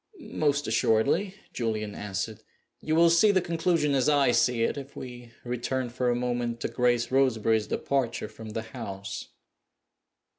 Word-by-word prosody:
"Most 145 -1 +1
assuredly," 115 - +2 0.2
Julian 110 -3 -2
answered. 105 +2 -4 0.4
"You 155 - -1
will 170 0 +6
see 170 +6 +5
the 195 -2 +4
conclusion 165 -3 +1
as 135 0 +3
I 140 -4 +4
see 120 0 +2
it - - 0
if 140 -1 -8
we 120 -2 -9
return 125 +1 -2
for 125 0 0
a 120 - +2
moment 120 -1 -2
to - - 0
Grace 120 0 +1
Roseberry's 115 -5 +2
departure 130 -6 -1
from 110 +1 -10
the 110 - -3
house." 105 -4 -7
125 Hz, 150 wpm, -27 LUFS, 115-140 Hz, 0.4 s, will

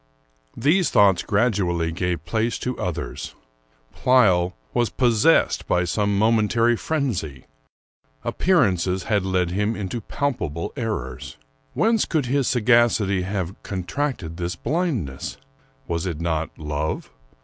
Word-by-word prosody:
These 170 +5 +3
thoughts 95 -3 +4
gradually 95 -7 +1
gave 90 0 -2
place 115 +5 0
to 125 0 -3
others. 90 -3 -4 0.6
Pleyel 95 -9 +3 0.2
was 120 - +1
possessed 125 +5 +3
by 90 - +2
some 100 +2 0
momentary 115 +2 +3
frenzy; 115 - -3 0.8
appearances 95 - +1
had 105 -3 +1
led 90 -2 0
him 105 +4 0
into 105 +3 -4
palpable 100 - -3
errors. 85 - -4 0.4
Whence 225 -1 +2
could 155 -5 0
his 135 +1 +1
sagacity 115 -5 +3
have 95 -1 -4
contracted 95 - -3
this 85 0 -3
blindness? 130 - -2 0.5
Was 85 +2 -2
it 85 -4 -4
not 80 -2 -1
love? 75 0 -3
100 Hz, 115 wpm, -23 LUFS, 85-120 Hz, 0.8 s, thoughts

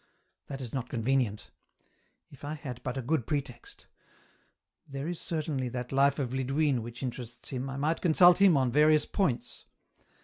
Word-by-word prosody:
That 135 -1 -6
is 120 -3 -7
not 125 -2 -3
convenient; 120 -3 -1 0.8
if 140 0 -16
I 145 +2 -4
had 130 -5 -7
but 130 0 -4
a 130 - -3
good 130 -1 -1
pretext; 280 - -5 1.0
there 140 +1 -5
is 175 -1 -4
certainly 150 -6 -2
that 125 0 -5
life 140 +1 +3
of 130 -4 -3
Lidwine 135 0 +1
which 120 +3 -8
interests 120 -2 -6
him, 130 0 -4
I 135 - -5
might 155 +4 0
consult 175 +1 +6
him 195 -6 +6
on 130 -2 +1
various 150 +2 +4
points. 125 - -2
135 Hz, 165 wpm, -29 LUFS, 125-155 Hz, 1.0 s, consult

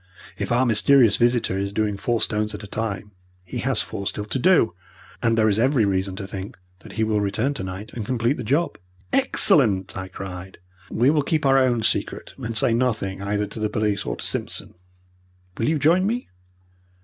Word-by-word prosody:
If 100 +2 -4
our 125 +2 +3
mysterious 115 0 +5
visitor 120 -5 +2
is 100 0 -2
doing 105 0 0
four 115 +3 -1
stones 105 0 -1
at 105 - -9
a - - -8
time, 105 -1 -4 0.3
he 90 - -6
has - - +1
four 100 - -5
still 105 - -3
to 130 - -2
do, 155 - +4 0.5
and 115 -1 +2
there 110 -1 +4
is 105 0 +2
every 125 -2 +3
reason 95 -1 -1
to 95 - -5
think 95 0 -7 0.2
that - - -13
he 110 - 0
will 110 -1 +1
return 105 +8 0
tonight 95 -4 -6
and 115 - -4
complete 120 +4 0
the 125 - -5
job." 145 +10 0 0.3
"Excellent!" 95 -3 +3
I 95 0 -5
cried. 95 0 -8 0.3
"We 125 +5 +3
will 150 -1 +2
keep 155 +1 -1
our 135 0 +5
own 120 -3 +2
secret, - - -1
and 115 -3 -3
say 115 - +3
nothing 110 -6 -1
either 105 +1 -1
to 105 +2 -9
the 105 0 0
police 105 -2 -1
or - - -3
to - - -7
Simpson. - - -4 0.9
Will 115 - +1
you 160 - +2
join 170 +7 +3
me?" 240 +3 -2
110 Hz, 195 wpm, -23 LUFS, 100-125 Hz, 0.9 s, mysterious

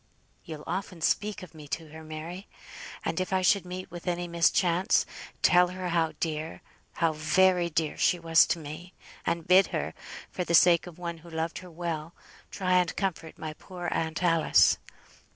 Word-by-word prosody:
You'll 155 -3 -8
often 180 0 -4
speak 210 +4 0
of 180 - -12
me 150 -2 -11
to 160 +2 -5
her, 160 +1 -11
Mary? 160 +5 -7 0.6
And - - -1
if 185 0 -2
I 190 -1 +1
should 180 +1 +3
meet 185 0 -7
with 175 +1 -9
any 175 0 -1
mischance, 170 +3 +2 0.4
tell 180 0 +6
her 180 0 -5
how 165 -2 +1
dear, 155 -1 -3 0.3
how 165 -2 +1
very 175 +3 +3
dear, 155 -1 -1
she 180 - +3
was 165 -1 +4
to - - 0
me, 160 +4 -9 0.3
and 170 -1 -1
bid 185 +2 +6
her, - - -3 0.4
for 180 - -2
the 170 -1 +1
sake 170 0 +5
of 175 -2 -11
one 170 -2 -5
who 170 +2 -14
loved 160 0 -3
her 185 - -12
well, 165 -1 -5 0.3
try 185 -2 +2
and 175 -2 -1
comfort 170 -5 -3
my 155 -1 -5
poor 175 +1 -6
aunt 160 +2 -2
Alice. 165 -2 +4
170 Hz, 180 wpm, -28 LUFS, 160-180 Hz, 0.6 s, tell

